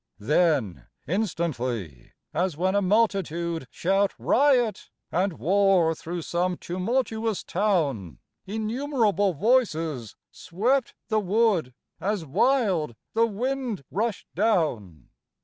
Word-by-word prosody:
Then 140 - +1 0.2
instantly, 130 - -3 0.2
as 175 -1 -1
when 185 +3 +1
a 200 - +2
multitude 180 - 0
Shout 195 - +1
riot 250 -7 +2 0.2
and 185 +2 +1
war 185 -1 +3
through 170 +2 -6
some 180 +2 -1
tumultuous 220 +3 -2
town, 155 - 0 0.3
Innumerable 215 - 0
voices 165 - +1 0.2
swept 235 +9 -1
the 220 - +2
wood 200 - +1 0.2
As 200 -4 -2
wild 185 - +1 0.2
the 230 +1 +3
wind 240 - -3
rushed 215 +1 -2
down. 150 - 0
190 Hz, 95 wpm, -26 LUFS, 160-220 Hz, 0.3 s, war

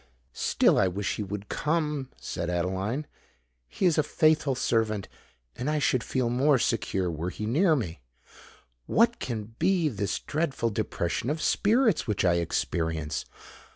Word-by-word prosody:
"Still - - +3
I 95 - +4
wish 95 +3 -2
he - - -3
would 100 +1 -6
come!" 150 -4 -1
said 85 - -4
Adeline. 95 - -1 0.6
"He 60 - -2
is 165 -3 +4
a - - +7
faithful 150 -2 +2
servant—and 110 - -3
I 155 - +1
should 130 -4 +1
feel 130 -2 -1
more 135 +3 +4
secure 95 -6 0
were 80 +3 -3
he 105 - -5
near 155 - +3
me. 85 - -4 0.9
What 235 +1 +3
can 115 -2 -5
be 180 -4 +2
this 100 -5 -2
dreadful 145 -7 -1
depression 95 +3 -2
of 155 +2 -1
spirits 220 - +2
which 105 -3 0
I 85 -1 +4
experience? 80 -2 -2
115 Hz, 145 wpm, -27 LUFS, 95-150 Hz, 0.9 s, a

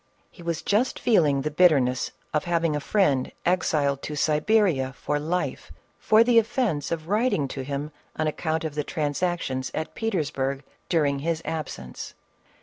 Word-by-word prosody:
lie 175 - -12
was 170 -2 -2
just 220 +6 +1
feeling 150 - +3
the 150 - -2
bitterness 140 -7 +3 0.2
of 150 - 0
having 170 -3 +1
a - - 0
friend 145 -6 +1
exiled 150 -6 +1
to 150 - -5
Siberia 150 -2 +2
for 145 +2 -2
life, 170 +4 -3 0.3
for 215 +1 +5
the 235 -1 +5
offence 215 - -1
of 160 -1 -3
writing 210 - +1
to 135 - -5
him 140 +2 -4 0.2
an 155 - -1
account 160 +1 -1
of 160 -2 -3
the 150 0 -2
transactions 150 -4 -2
at 155 - -3
Peters 190 -10 -1
burg 135 -1 -2 0.3
during 145 -5 +2
his 165 +2 -1
absence. 65 - -6
155 Hz, 155 wpm, -25 LUFS, 140-180 Hz, 0.3 s, for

